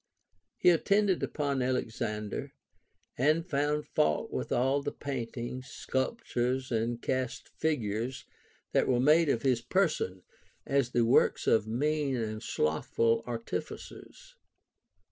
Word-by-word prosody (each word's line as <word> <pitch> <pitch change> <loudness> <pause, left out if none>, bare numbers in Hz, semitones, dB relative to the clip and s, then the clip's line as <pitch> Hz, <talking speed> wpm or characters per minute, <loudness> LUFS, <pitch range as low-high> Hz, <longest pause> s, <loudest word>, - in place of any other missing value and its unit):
He 180 - +6
attended 200 +2 +2
upon 140 -3 -1
Alexander, 110 -4 -2 0.7
and 155 +5 +3
found 150 -1 0
fault 75 0 +1
with - - -3
all 135 +3 +2
the 145 0 -3
paintings, 125 -1 -5
sculptures, 130 - -2
and 115 +1 0
cast 130 -1 -2
figures 125 -4 -2 0.5
that - - +2
Avere 125 -1 +2
made 155 +2 +5
of 115 -4 +1
his 125 -3 +2
person, 120 - 0 0.4
as 135 -3 +1
the 120 -1 +2
works 120 - +3
of 110 -1 +3
mean 145 +4 0
and 110 -2 -3
slothful 115 +9 +1
artificers. 125 - -6
130 Hz, 115 wpm, -30 LUFS, 115-145 Hz, 0.7 s, He